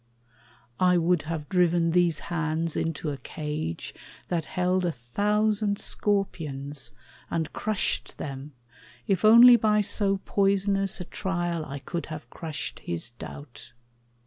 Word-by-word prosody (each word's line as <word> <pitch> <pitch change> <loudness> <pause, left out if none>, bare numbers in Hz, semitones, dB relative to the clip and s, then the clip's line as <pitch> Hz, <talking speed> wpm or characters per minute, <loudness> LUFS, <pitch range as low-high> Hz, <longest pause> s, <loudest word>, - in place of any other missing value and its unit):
I 180 -1 +4
would 175 -1 +2
have 155 -3 -3
driven 175 -2 +2
these 170 -2 +2
hands 160 0 -1
into 160 -1 -2
a 140 - -5
cage 150 - -5 0.4
That 170 -3 -1
held 180 +1 0
a 175 - +1
thousand 205 - 0
scorpions, 150 - -2 0.4
and 160 -2 -2
crushed 215 -2 -2
them, 140 +1 -6 0.5
If 190 -3 +1
only 235 +3 +9
by 210 -2 +3
so 200 -1 +1
poisonous 195 -1 +2
a - - -5
trial 175 -4 -2
I 140 0 -6
could 170 +5 -5
have 155 -1 -8
crushed 155 -4 -5
his 85 +7 -4
doubt. 135 +2 -10
175 Hz, 125 wpm, -27 LUFS, 150-195 Hz, 0.5 s, only